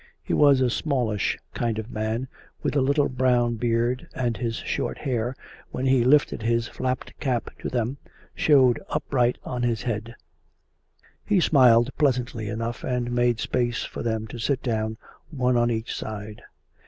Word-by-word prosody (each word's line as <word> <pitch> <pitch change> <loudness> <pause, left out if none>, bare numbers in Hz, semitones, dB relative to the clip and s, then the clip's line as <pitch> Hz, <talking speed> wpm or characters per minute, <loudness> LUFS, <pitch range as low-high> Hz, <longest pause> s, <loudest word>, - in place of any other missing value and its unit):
He - - -3
was 140 -3 +5
a 125 - +3
smallish 120 -10 0 0.2
kind 115 -2 -1
of 110 +1 -5
man, 110 +4 -2 0.4
with - - -1
a 140 - +4
little 140 +2 +2
brown 125 -2 +1
beard, 120 +2 0
and 120 -3 -1
his 115 +2 -2
short - - -3
hair, 125 -1 -2 0.3
when 130 - -3
he 130 -2 +4
lifted 135 -2 +3
his 115 0 +1
flapped 130 0 -3
cap 125 -5 -1
to - - -4
them, 125 +2 -1 0.4
showed 130 -5 +4
upright 125 -5 +1
on 125 -1 -4
his 120 -2 0
head; 115 0 -3 1.1
he 205 -3 +2
smiled 125 -6 +5
pleasantly 125 -6 0
enough, 115 +2 -4
and 125 -1 -1
made 120 -1 +2
space 120 0 -1
for - - -6
them 110 -1 -1
to 120 - -7
sit 130 +3 0
down, 110 -2 -1 0.3
one 125 -5 +1
at 120 0 +3
each 110 -1 -2
side. 105 -1 -6
120 Hz, 160 wpm, -25 LUFS, 115-130 Hz, 1.1 s, was